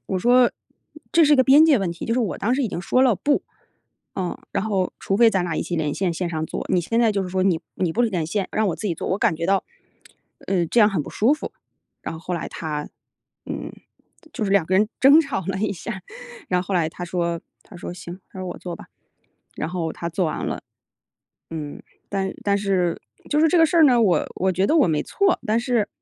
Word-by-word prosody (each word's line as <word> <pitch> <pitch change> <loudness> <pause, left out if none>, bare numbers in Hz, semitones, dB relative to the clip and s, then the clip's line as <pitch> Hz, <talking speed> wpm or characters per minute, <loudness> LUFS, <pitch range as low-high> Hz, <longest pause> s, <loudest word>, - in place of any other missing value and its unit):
我 190 - -1
说： 245 +4 +5 0.6
“这 335 - +5
是 295 0 +6
一 - - +2
个 260 - +5
边 285 +4 +7
界 290 -7 +5
问 180 -3 -1
题，” 170 - -7
就 230 - 0
是 255 - +1
我 210 -6 -2
当 230 +5 +1
时 275 - 0
已 235 - 0
经 175 - -4
说 255 +8 +2
了， 250 -5 +4
不。 285 +9 +1 0.7
呃， 180 -2 -3
然 - - -1
后 195 -4 0
除 195 - -2
非 230 +1 +6
咱 190 -4 +1
俩 170 -2 -2
一 - - 0
起 175 - -3
连 150 -2 -1
线， 190 -2 0
线 175 +1 -2
上 160 -1 -2
做， - - -5
你 180 - +4
现 230 +7 -1
在 225 -3 +4
就 200 - 0
是 185 - -5
说 185 0 0
你 180 -4 +2
你 175 -3 -1
不 - - -1
连 185 -9 0
线， 195 +3 -2
让 215 0 +1
我 175 - -1
自 215 - -4
己 175 - 0
做， - - -5
我 190 - 0
感 160 - +2
觉 165 - -3
到， 195 +2 +2 0.8
呃， 180 -3 +1
这 235 - +2
样 210 - +7
很 190 -7 -1
不 - - -9
舒 245 +8 +3
服。 - - -7 0.5
然 - - -5
后 - - -8
后 170 +2 -6
来 170 - -3
他， 150 -2 -5 0.6
嗯， - - -5 0.6
就 230 - -2
是 195 - -1
2 200 -3 +4
个 185 - -1
人 210 +3 +3
争 280 +4 +8
吵 275 - -3
了 195 0 -2
一 215 +1 0
下， 190 +2 -6 0.5
然 180 -1 +1
后 - - -14
后 200 - -2
来 170 -3 +2
他 175 +2 -7
说 170 -1 -2 0.2
他 185 - -14
说： 175 - -6
“行，” 175 0 -9
他 - - -11
说： 185 - -4
“我 - - -6
做 175 -2 -6
吧，” - - -12 0.7
然 155 - -3
后 165 -2 -3
他 170 - -5
做 175 +2 -1
完 - - -3
了。 - - -4 0.9
嗯， 155 -3 -6 0.3
但 195 -1 -2
但 200 -1 +2
是 190 -4 0 0.3
就 300 +1 +3
是 320 - +5
这 350 - +3
个 325 - +6
事 335 +2 +1
儿 320 - +8
呢， 245 -4 +5
我 195 -6 +3
我 190 +1 +1
觉 185 +2 +1
得 320 - +3
我 300 - +5
没 155 -2 +1
错， 395 -3 +1
但 220 +1 +2
是 235 -3 0
190 Hz, 270 characters per minute, -23 LUFS, 175-235 Hz, 0.9 s, 争